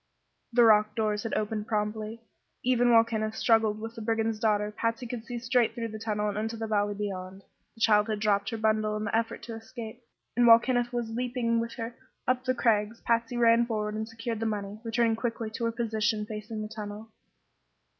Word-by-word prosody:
The 240 Hz, 0 st, +5 dB
rock 215 Hz, -1 st, +5 dB
doors 215 Hz, -2 st, 0 dB
had 225 Hz, -, -3 dB
opened 215 Hz, 0 st, -2 dB
promptly. 215 Hz, +1 st, -2 dB, 0.4 s
Even 245 Hz, -1 st, +3 dB
while 230 Hz, -1 st, +7 dB
Kenneth 220 Hz, -1 st, -2 dB
struggled 220 Hz, -2 st, +3 dB
with 225 Hz, +1 st, -6 dB
the 230 Hz, -, -8 dB
brigand's 225 Hz, 0 st, 0 dB
daughter 210 Hz, -1 st, +1 dB
Patsy 230 Hz, +3 st, -2 dB
could 235 Hz, -1 st, -6 dB
see 245 Hz, 0 st, -5 dB
straight 245 Hz, 0 st, +1 dB
through 230 Hz, -1 st, -3 dB
the 220 Hz, 0 st, -7 dB
tunnel 210 Hz, -1 st, -1 dB
and 205 Hz, 0 st, -2 dB
into 225 Hz, +1 st, -3 dB
the 225 Hz, -, -3 dB
valley 205 Hz, -1 st, 0 dB
beyond. 190 Hz, -2 st, -5 dB, 0.3 s
The 225 Hz, -, -15 dB
child 210 Hz, -1 st, +5 dB
had 215 Hz, -2 st, -2 dB
dropped 200 Hz, -2 st, +1 dB
her 225 Hz, -, -3 dB
bundle 215 Hz, -1 st, +1 dB
in 215 Hz, -, -3 dB
the 205 Hz, 0 st, -1 dB
effort 230 Hz, 0 st, -1 dB
to 235 Hz, -, -6 dB
escape, 230 Hz, 0 st, -9 dB, 0.3 s
and 240 Hz, 0 st, +4 dB
while 230 Hz, 0 st, +10 dB
Kenneth 245 Hz, 0 st, 0 dB
was 240 Hz, -2 st, -3 dB
leaping 240 Hz, -1 st, 0 dB
with 230 Hz, 0 st, -3 dB
her 230 Hz, 0 st, -5 dB, 0.3 s
up 255 Hz, 0 st, +1 dB
the 255 Hz, 0 st, +1 dB
crags 220 Hz, -2 st, +1 dB
Patsy 230 Hz, +1 st, 0 dB
ran 235 Hz, 0 st, +5 dB
forward 210 Hz, -2 st, -2 dB
and 220 Hz, +1 st, -4 dB
secured 225 Hz, 0 st, -4 dB
the 225 Hz, -, -1 dB
money, 205 Hz, -1 st, -4 dB
returning 230 Hz, 0 st, +1 dB
quickly 230 Hz, -1 st, -3 dB
to 230 Hz, +2 st, -3 dB
her 230 Hz, -, +1 dB
position 220 Hz, -2 st, -1 dB
facing 215 Hz, 0 st, -5 dB
the -, -, -4 dB
tunnel. 215 Hz, 0 st, -8 dB
225 Hz, 205 wpm, -28 LUFS, 215-230 Hz, 0.4 s, while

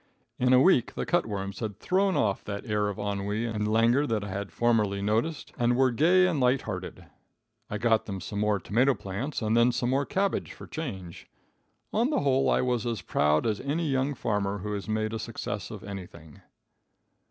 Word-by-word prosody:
In 125 Hz, 0 st, +3 dB
a 130 Hz, -, +7 dB
week 130 Hz, -5 st, +4 dB
the -, -, -2 dB
cut 175 Hz, -, +1 dB
worms 100 Hz, -2 st, -4 dB
had 110 Hz, -3 st, -4 dB
thrown 190 Hz, +1 st, +1 dB
off 100 Hz, -3 st, 0 dB
that 100 Hz, +2 st, -5 dB
air 105 Hz, -2 st, 0 dB
of 100 Hz, -, -5 dB
ennui 100 Hz, +2 st, -2 dB
and 110 Hz, -2 st, -2 dB
languor 120 Hz, +6 st, +3 dB
that 110 Hz, -4 st, -1 dB
I 100 Hz, -, -6 dB
had 100 Hz, +1 st, -4 dB
I -, -, -22 dB
formerly 110 Hz, -4 st, +1 dB
noticed, 110 Hz, +10 st, -1 dB
and 120 Hz, 0 st, +3 dB
were 130 Hz, 0 st, +3 dB
gay 175 Hz, +9 st, +4 dB
and 170 Hz, -5 st, +1 dB
light 125 Hz, +1 st, +2 dB
hearted. -, -, -6 dB, 0.6 s
I 105 Hz, -, -2 dB
got 115 Hz, 0 st, +2 dB
them 95 Hz, -2 st, -4 dB
some 100 Hz, +3 st, -5 dB
more 105 Hz, -1 st, +1 dB
tomato 125 Hz, +9 st, +2 dB
plants, 110 Hz, +8 st, -4 dB
and 110 Hz, +1 st, +1 dB
then 120 Hz, +1 st, +5 dB
some 120 Hz, +1 st, -1 dB
more 140 Hz, +1 st, +1 dB
cabbage 195 Hz, 0 st, -1 dB
for -, -, -11 dB
change. 95 Hz, -, -7 dB, 0.7 s
On 235 Hz, +5 st, +2 dB
the 305 Hz, -, +1 dB
whole 135 Hz, -1 st, +2 dB
I -, -, +3 dB
was 125 Hz, -3 st, 0 dB
as 115 Hz, -3 st, -3 dB
proud 75 Hz, +1 st, +2 dB
as 110 Hz, -2 st, 0 dB
any 155 Hz, +5 st, -1 dB
young 135 Hz, +1 st, 0 dB
farmer 105 Hz, -4 st, -1 dB
who 105 Hz, +2 st, -4 dB
has 100 Hz, +1 st, -5 dB
made 110 Hz, 0 st, -1 dB
a 115 Hz, -, -3 dB
success -, -, -5 dB
of -, -, -8 dB
anything. 90 Hz, -6 st, -9 dB
115 Hz, 205 wpm, -28 LUFS, 100-130 Hz, 0.7 s, a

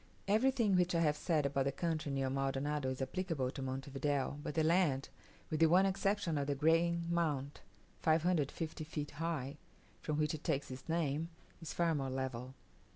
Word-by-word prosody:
Everything 220 Hz, -1 st, +3 dB
which 180 Hz, -1 st, +2 dB
I 165 Hz, -, +3 dB
have 150 Hz, -2 st, +3 dB
said 155 Hz, -2 st, +1 dB
about 140 Hz, -1 st, +1 dB
the 140 Hz, -, +1 dB
country 155 Hz, 0 st, -2 dB
near 135 Hz, -1 st, 0 dB
Maldonado 135 Hz, +1 st, -1 dB
is 130 Hz, 0 st, -2 dB
applicable 150 Hz, -3 st, -2 dB
to 135 Hz, -, -6 dB
Monte 135 Hz, +1 st, -4 dB
Video; 140 Hz, +1 st, -1 dB
but 145 Hz, -, -5 dB
the 160 Hz, -, +3 dB
land, 155 Hz, -5 st, +2 dB, 0.4 s
with 155 Hz, -, 0 dB
the 165 Hz, -, +6 dB
one 180 Hz, +4 st, +5 dB
exception 195 Hz, -4 st, 0 dB
of 140 Hz, -, -2 dB
the 145 Hz, -, 0 dB
Green 165 Hz, +3 st, +3 dB
Mount 150 Hz, -5 st, -1 dB, 0.4 s
450 160 Hz, -1 st, +1 dB
feet 150 Hz, -1 st, -5 dB
high, 150 Hz, -4 st, -2 dB, 0.4 s
from 150 Hz, -1 st, -2 dB
which 150 Hz, +1 st, +1 dB
it 155 Hz, -, -6 dB
takes 140 Hz, -1 st, -1 dB
its 130 Hz, +5 st, -9 dB
name, 160 Hz, -1 st, 0 dB, 0.3 s
is 165 Hz, -, -5 dB
far 170 Hz, -1 st, +1 dB
more 135 Hz, -3 st, -1 dB
level. 130 Hz, -1 st, -4 dB
150 Hz, 180 wpm, -35 LUFS, 135-170 Hz, 0.4 s, the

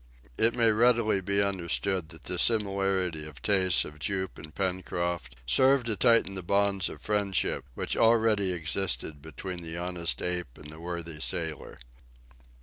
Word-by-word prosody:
It 115 Hz, -, +3 dB
may 115 Hz, -2 st, +4 dB
readily 115 Hz, -2 st, +3 dB
be 100 Hz, +2 st, +1 dB
understood 95 Hz, -2 st, -1 dB
that 80 Hz, -2 st, -13 dB
this 90 Hz, -1 st, 0 dB
similarity 95 Hz, -7 st, 0 dB
of 75 Hz, -3 st, -11 dB
tastes 95 Hz, -, +2 dB
of 75 Hz, 0 st, -11 dB
Jup 95 Hz, +4 st, -2 dB
and 75 Hz, -1 st, -11 dB
Pencroft 90 Hz, -7 st, -2 dB
served 130 Hz, -, +4 dB
to 110 Hz, -2 st, -1 dB
tighten 115 Hz, -2 st, +3 dB
the 95 Hz, -, -4 dB
bonds 100 Hz, +1 st, +1 dB
of -, -, -11 dB
friendship 100 Hz, -8 st, 0 dB
which -, -, -2 dB
already 110 Hz, -4 st, +3 dB
existed 80 Hz, -2 st, -2 dB
between 85 Hz, +4 st, -7 dB
the 85 Hz, 0 st, -5 dB
honest 85 Hz, -1 st, -1 dB
ape 90 Hz, -7 st, -3 dB
and 75 Hz, 0 st, -11 dB
the 80 Hz, -, -12 dB
worthy 85 Hz, -2 st, -5 dB
sailor. 80 Hz, -3 st, -2 dB
95 Hz, 150 wpm, -28 LUFS, 85-100 Hz, -, may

